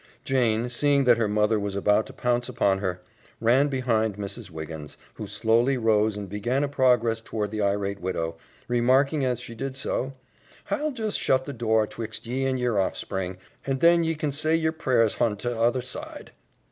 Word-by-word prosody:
Jane, 120 -3 +1
seeing 140 +2 +3
that 120 -2 +4
her 110 - +2
mother 105 +1 +2
was 100 -1 -3
about 105 +2 +2
to - - -11
pounce 120 0 0
upon 100 -5 +1
her, 90 -2 -3 0.4
ran 125 +5 +4
behind 115 -6 0
Mrs. 100 +1 -6
Wiggins, 80 -2 -8 0.2
who 105 - -7
slowly 115 +6 +2
rose 110 -2 +2
and 100 -1 -5
began 120 +8 -1
a - - +1
progress 125 -5 +2
toward 105 -2 -3
the 110 -1 -2
irate 100 0 0
widow, 85 -2 -2 0.3
remarking 130 +5 +2
as 125 -2 0
she 120 -2 -8
did 135 +3 -5
so, 135 0 -2 0.5
"Hi'll 305 0 -1
just 225 -6 -2
shut 130 0 +2
the 140 - -5
door 110 -2 +2
'twixt 110 +1 -7
ye 130 +3 -2
and 130 -1 0
yer 120 -4 0
hoffspring, 95 -1 -2 0.3
and 135 -1 -2
then 170 +2 +5
ye 165 0 0
kin 150 -1 -2
say 155 +3 +1
yer 160 -1 +1
prayers 125 -8 +2
hon 115 -3 +1
the 120 +4 -3
t'other 120 +2 +1
side." 130 - -6
115 Hz, 185 wpm, -26 LUFS, 105-130 Hz, 0.5 s, then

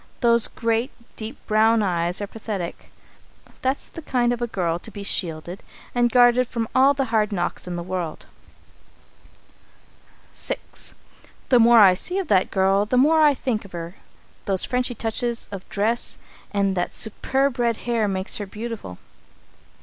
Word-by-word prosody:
Those 235 -2 +4
great, 230 +2 -1 0.3
deep 220 +4 -7
brown 220 +1 +3
eyes 175 0 0
are - - -1
pathetic. 205 -4 -6 0.7
That's 265 +2 -1
the 330 - -9
kind 245 -5 +1
of 240 - -5
a 240 - 0
girl 175 -6 -1
to 225 - -8
be 205 -1 -8
shielded 170 -1 -2 0.3
and 240 -1 +2
guarded 245 0 +5
from 230 -2 -3
all 270 +2 +5
the 270 -1 0
hard 215 -1 +2
knocks 175 -2 -3
in 175 - -4
the 175 - -4
world. 180 -3 -4 2.1
VI. - - -2 0.9
"The 250 - +6
more 235 0 +7
I 190 -3 +8
see 360 - -3
of 380 -6 -2
that 190 -2 +3
girl, 195 +1 +2
the 250 - +1
more 310 +5 +5
I 295 -2 +5
think 240 -5 -2
of 200 - -15
her. 170 0 -6 0.5
Those 195 -2 0
Frenchy 250 -1 -1
touches 230 +2 -2
of 195 -2 -8
dress 220 +4 0 0.3
and 200 -2 +1
that 175 - -2
superb 265 +4 -1
red 235 -2 +1
hair 230 -3 +1
make 190 -1 -1
her 205 - -5
beautiful. 215 - -7
220 Hz, 160 wpm, -23 LUFS, 190-245 Hz, 2.1 s, I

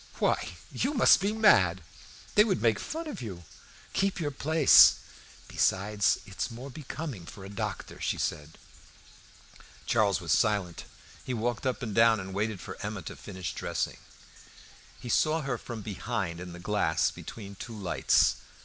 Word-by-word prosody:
"Why, - - 0 0.2
you 290 +3 -1
must 245 - +6
be 200 +2 +1
mad! 95 - +4 0.5
They 210 - +7
would 205 -4 0
make 115 -3 +2
fun 325 +1 -5
of 300 - -6
you; 95 -7 -7 0.5
keep 195 -1 0
your 150 -3 -2
place. 155 +2 +6 0.5
Besides, 105 +2 +1
it 95 - -13
is - - 0
more 125 +4 -8
becoming 140 - -7
for 100 -4 -10
a - - -9
doctor," 100 - -5
she - - -1
added. 75 +2 -4 1.3
Charles 105 -5 +2
was 85 -3 -4
silent. 100 -3 +1 0.4
He 130 - -3
walked 120 +3 -2
up 130 +1 -2
and 110 -4 -4
down 110 -4 +3
waiting 105 +1 -1
for 90 - -9
Emma 105 -3 -5
to - - -7
finish 95 -4 -6
dressing. - - -3 1.0
He - - -9
saw 155 +6 +2
her 130 -5 -3
from 115 -3 -7
behind 95 -4 -3
in 90 0 -7
the 90 - -9
glass 90 -4 +1
between 100 -3 -9
two 110 +3 -8
lights. 95 -4 +2
110 Hz, 160 wpm, -29 LUFS, 95-135 Hz, 1.3 s, They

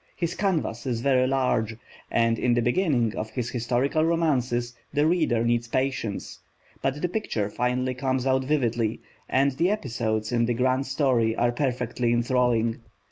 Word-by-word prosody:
His 170 -1 -2
canvas 160 - -1
is 120 -2 -1
very 130 -1 +3
large, 125 -4 0 0.3
and 115 -1 +2
in 120 -1 +2
the 120 - +2
beginning 125 - +1
of 110 - -4
his 120 +2 -4
historical 125 +5 0
romances 130 -8 +1 0.2
the 145 +1 +2
reader 155 -9 +2
needs 120 0 +1
patience, 130 -4 -2 0.4
but 135 +2 -1
the - - +3
picture 120 - -2
finally 125 +2 0
comes 130 0 -1
out 130 0 +2
vividly, 120 -6 0 0.3
and 135 +2 +3
the 165 +7 +1
episodes 115 - -2
in 120 -1 +2
the 120 - 0
grand 130 +2 +1
story 130 -5 +1
are 120 +1 +2
perfectly 120 -2 -1
enthralling. 120 -2 +1
125 Hz, 155 wpm, -26 LUFS, 115-135 Hz, 0.4 s, very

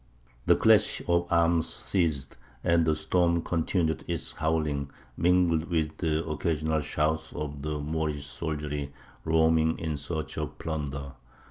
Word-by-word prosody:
The - - +7
clash - - +4
of 85 0 +2
arms 85 -1 +3
ceased, 80 -8 -1 0.3
and 85 -1 +3
the 80 - +3
storm 85 +2 +1
continued 80 -1 0
its - - -3
howling, 75 -3 -1 0.3
mingled 85 -1 +3
with 80 -3 -1
the 80 -1 0
occasional 80 0 0
shout 80 +2 -1
of 75 -1 -4
the 75 0 -3
Moorish 75 -1 -2
soldiery 75 -2 -4 0.3
roaming 80 0 +3
in 80 -2 -3
search 75 0 -4
of - - -4
plunder. 70 -4 -4
80 Hz, 130 wpm, -28 LUFS, 75-85 Hz, 0.3 s, The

